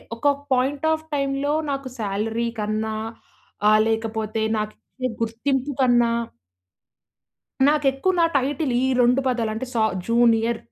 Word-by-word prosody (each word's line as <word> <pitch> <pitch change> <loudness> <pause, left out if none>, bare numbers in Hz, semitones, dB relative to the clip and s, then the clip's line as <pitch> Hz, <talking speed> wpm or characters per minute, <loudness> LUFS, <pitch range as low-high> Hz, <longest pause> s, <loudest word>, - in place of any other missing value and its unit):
ఒక 230 - -12 0.3
point 270 +3 0
of 315 0 -4
టైమ్‌లో 275 +1 0 0.2
నాకు 275 -1 -3
సాలరీ 220 +3 -1
కన్నా 215 +1 -2 0.8
ఆహ్, 215 0 +5
లేకపోతే 220 -1 -2 0.2
నాకిచ్చే 215 +4 -5
గుర్తింపు 260 +5 -1
కన్నా 240 -2 +4 1.6
నాకెక్కువ 295 +4 +2
నా - - +5
టైటిల్ 275 +1 0
ఈ - - +2 0.2
2 245 +2 +4
పదాలంటే 230 -1 -2
సా 225 - +2 0.2
జూనియర్ 230 0 +3
240 Hz, 110 wpm, -23 LUFS, 220-275 Hz, 1.6 s, ఆహ్